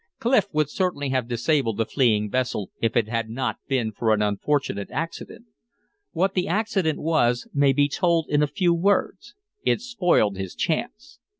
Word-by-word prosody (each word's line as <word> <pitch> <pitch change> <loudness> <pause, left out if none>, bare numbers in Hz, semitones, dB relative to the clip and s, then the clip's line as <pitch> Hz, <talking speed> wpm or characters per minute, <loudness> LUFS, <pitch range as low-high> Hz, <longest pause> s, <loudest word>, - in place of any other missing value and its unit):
Clif 230 -5 +2
would 155 -2 +1
certainly 180 -8 -1
have 130 -3 -1
disabled 120 -1 0
the 115 - +1
fleeing 110 -6 +2
vessel 125 -6 -2
if 115 +1 +1
it 115 -3 +2
had 115 0 -2
not 130 +3 -2
been 125 -5 0
for 110 +1 0
an 105 - -2
unfortunate 105 0 -1
accident. 165 +7 -6 0.7
What 190 +3 0
the 185 0 0
accident 190 -5 0
was 125 -7 +1
may 140 -1 +4
be 145 +2 +3
told 165 +2 +1
in 145 0 +2
a 150 - +3
few 170 +4 +1
words. 195 +4 0 0.3
It - - +2
spoiled 180 - +1
his 95 -1 -6
chance. 260 - -3
145 Hz, 170 wpm, -24 LUFS, 115-175 Hz, 0.7 s, may